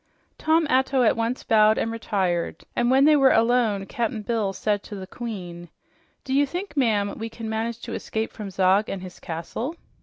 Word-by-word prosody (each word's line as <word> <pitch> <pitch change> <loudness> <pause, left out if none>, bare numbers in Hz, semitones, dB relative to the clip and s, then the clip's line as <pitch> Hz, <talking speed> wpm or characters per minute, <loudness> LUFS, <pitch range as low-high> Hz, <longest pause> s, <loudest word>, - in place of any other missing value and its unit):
Tom 320 +1 +3
Atto 265 -1 +2
at 225 - +4
once 230 +2 -2
bowed 215 -1 +4
and 225 - -1
retired, 190 -6 -2
and 240 0 +2
when 265 +2 +5
they 305 0 +6
were 270 -2 +5
done, 225 -4 +2
Cap'n 225 0 -3
Bill 220 -3 0
said 205 +1 -1
to 210 - -9
the 190 -1 -6
queen, 180 -7 -7 0.5
"Do 265 - -4
you 285 +1 +3
think, 355 +2 -5
ma'am, 215 -7 +1
we 225 +1 -4
can 225 0 -7
manage 225 +1 -2
to 235 - -6
escape 220 0 -3
from 210 -3 -7
Zog 190 +2 +2
and 190 -1 -4
his 185 -1 -10
castle?" 175 - -5
225 Hz, 190 wpm, -24 LUFS, 200-250 Hz, 0.5 s, they